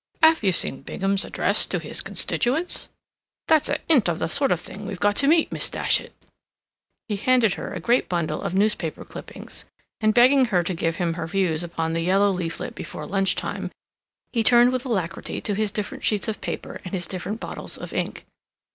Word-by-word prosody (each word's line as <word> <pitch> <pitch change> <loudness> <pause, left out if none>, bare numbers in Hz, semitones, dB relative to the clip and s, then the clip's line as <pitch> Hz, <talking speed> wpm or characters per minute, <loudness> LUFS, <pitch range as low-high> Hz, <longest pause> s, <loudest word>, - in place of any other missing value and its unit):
Have 320 0 +6
you 195 -3 +3
seen 150 -5 +1
Bingham's 195 +7 -1
address - - +1
to - - -1
his - - -1
constituents? 295 +9 0 0.6
That's 315 -2 +3
a 290 - +1
hint 265 - +4
of 165 - -1
the 160 - -2
sort 280 +4 +3
of 175 - +2
thing 200 +3 -8
we've 195 -3 -6
got 205 0 +2
to 275 - +3
meet, 320 +1 +4
Miss - - +1
Datchet." - - +1 1.0
He 210 -3 -2
handed 235 -2 +3
her - - -6
a - - -4
great 240 +2 +1
bundle 165 -3 -1
of 180 - -3
newspaper 195 -5 0
cuttings, - - -10 0.4
and, 215 -1 +3
begging 255 +4 +5
her 185 -7 +1
to 180 - -2
give 165 -1 -1
him 170 -1 -1
her 165 -1 -4
views 175 -3 0
upon 165 -1 -3
the 165 - -1
yellow 195 +4 +3
leaflet 175 -3 -4
before - - -7
lunch 195 0 +1
time, - - -4 0.6
he 230 - +2
turned 240 +3 +6
with 255 +1 -1
alacrity 190 -6 -2
to 205 - -1
his 215 +1 0
different 210 -2 -5
sheets 210 -3 +1
of 220 - -3
paper - - -5
and 185 +1 -5
his 180 -2 -2
different 195 +4 -5
bottles - - -6
of - - -8
ink. - - -3
200 Hz, 200 wpm, -24 LUFS, 175-240 Hz, 1.0 s, Have